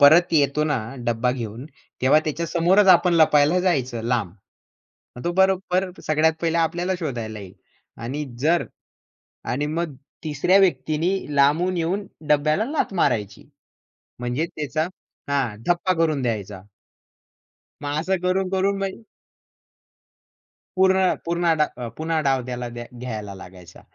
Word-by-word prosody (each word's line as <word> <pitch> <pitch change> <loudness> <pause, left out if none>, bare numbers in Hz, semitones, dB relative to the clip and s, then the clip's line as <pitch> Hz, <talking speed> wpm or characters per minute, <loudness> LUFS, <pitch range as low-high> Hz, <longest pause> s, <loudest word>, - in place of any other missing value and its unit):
परत 160 +5 +6
येतो 150 -1 +3
ना 150 -2 +1 0.3
डब्बा 120 +1 +1
घेऊन, 115 0 -6 0.4
तेव्हा 140 +4 +6
त्याच्या 160 +2 -2
समोरच 180 +5 +3
आपण 180 -1 +6
लपायला 155 +1 +4
जायचं 130 -10 0
लांब. 115 -5 0 0.9
मग 120 - -9
तो 175 - +1
बरोबर 190 0 +2 0.2
सगळ्यात 155 +1 +3
पहिला 170 0 +1
आपल्याला 175 +3 0
शोधायला 115 -8 -4
येईल 95 -2 -10 0.5
आणि 140 +5 -3 0.2
जर 165 +4 +2 0.9
आणि 145 +4 -1
मग 155 -1 -3 0.3
तिसऱ्या 155 +5 +2
व्यक्तीनी 160 0 +1 0.2
लांबून 160 +6 +3
येऊन 185 +5 -1 0.2
डब्याला 150 +7 +2
लाथ 300 -9 -1
मारायची. 110 - -1 0.7
म्हणजे 125 +6 -1
त्याचा 155 +2 -1 0.4
हा 135 -7 0
धप्पा 175 +2 +2
करून 160 -4 +1
द्यायचा. 105 -5 -3 1.2
मग 145 +1 -2
असं 190 +4 0
करून 185 +1 +1
करून 195 +1 +1
म्ह 195 -1 -3 1.8
पूर्ण, 190 0 +4
पूर्ण 170 0 +1
डा 150 - +4 0.3
पुन्हा 160 0 -1
डाव 135 -3 +1
द्याय 120 -1 -5
घ्यायला 110 -5 -6
लागायचा. 90 -2 -13
155 Hz, 125 wpm, -23 LUFS, 125-175 Hz, 1.8 s, परत